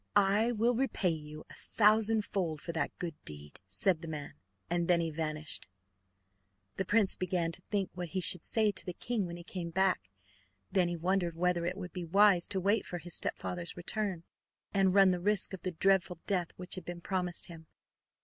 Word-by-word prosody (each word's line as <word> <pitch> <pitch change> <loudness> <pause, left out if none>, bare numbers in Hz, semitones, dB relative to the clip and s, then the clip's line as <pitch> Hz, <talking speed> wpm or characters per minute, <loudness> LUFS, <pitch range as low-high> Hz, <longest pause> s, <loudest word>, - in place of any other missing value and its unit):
"I 205 +3 +4
will 235 +1 +2
repay 235 -7 +1
you 155 -1 -7
a - - -9
thousand 215 0 +3
fold 170 -6 -2
for 170 - -5
that 160 -3 -2
good 170 -2 -4
deed." 75 +1 -9
said 160 - +1
the 165 - -7
man, 150 -2 -6 0.3
and 170 0 0
then 175 -1 +4
he 165 -1 -1
vanished. 155 - -2 1.1
The 190 - -1
prince 205 0 +3
began 175 -2 -1
to 175 - -7
think 200 -3 -1
what 180 -1 -4
he 190 - -2
should 180 -1 +3
say 215 -2 +2
to - - -6
the 180 - -5
king 220 -1 -2
when 170 0 -6
he 175 - -10
came 175 -1 -5
back; 180 - +1 0.6
then 185 -2 +3
he 175 - -2
wondered 175 0 0
whether 175 0 +1
it 180 +2 -3
would 180 -2 -7
be 180 - -4
wise 190 +1 +4
to 195 - 0
wait 200 +3 +2
for 175 - -5
his 175 0 -7
stepfather's 175 -1 -2
return 185 -1 -2 0.5
and 195 -1 +3
run 195 -2 +7
the 180 - 0
risk 200 +1 +3
of 190 - -6
the 185 - -2
dreadful 180 0 +2
death 180 -4 0
which 180 0 -4
had 185 - 0
been 175 +1 -7
promised 180 -2 -1
him. 160 -2 -10
180 Hz, 200 wpm, -32 LUFS, 170-195 Hz, 1.1 s, run